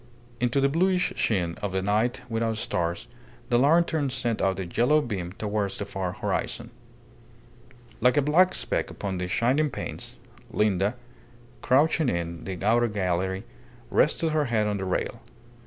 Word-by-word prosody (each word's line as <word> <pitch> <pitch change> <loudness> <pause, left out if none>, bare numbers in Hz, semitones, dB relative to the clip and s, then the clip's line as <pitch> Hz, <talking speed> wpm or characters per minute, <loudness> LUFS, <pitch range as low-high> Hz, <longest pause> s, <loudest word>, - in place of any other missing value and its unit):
Into 125 +3 +1
the 135 - +4
bluish 180 +5 +1
sheen 90 -6 0
of 100 -2 -3
a 95 - +1
night 110 +5 0
without 115 -1 -1
stars 85 +1 -2 0.4
the 120 -1 +4
lantern 155 0 +3
sent 120 -3 -1
out 95 0 +1
a 95 - -3
yellow 120 - +3
beam 100 - -4
towards 105 -1 -2
the 100 - -3
far 95 -2 -3
horizon. 115 +5 -3 1.3
Like 125 +4 +3
a 145 - +4
black 175 +6 +4
speck - - -1
upon 95 -3 -4
the 90 - -2
shining 130 +10 +2
panes, 125 - -6 0.3
Linda, 105 +1 +1 0.7
crouching 145 +1 +3
in 85 -2 -3
the 95 -1 -4
outer 120 +2 +4
gallery, 95 -2 -1 0.5
rested 165 -1 +2
her 155 -1 +1
head 115 -4 +1
on 105 -1 -1
the 95 - -3
rail. 95 - -2
115 Hz, 155 wpm, -26 LUFS, 95-135 Hz, 1.3 s, the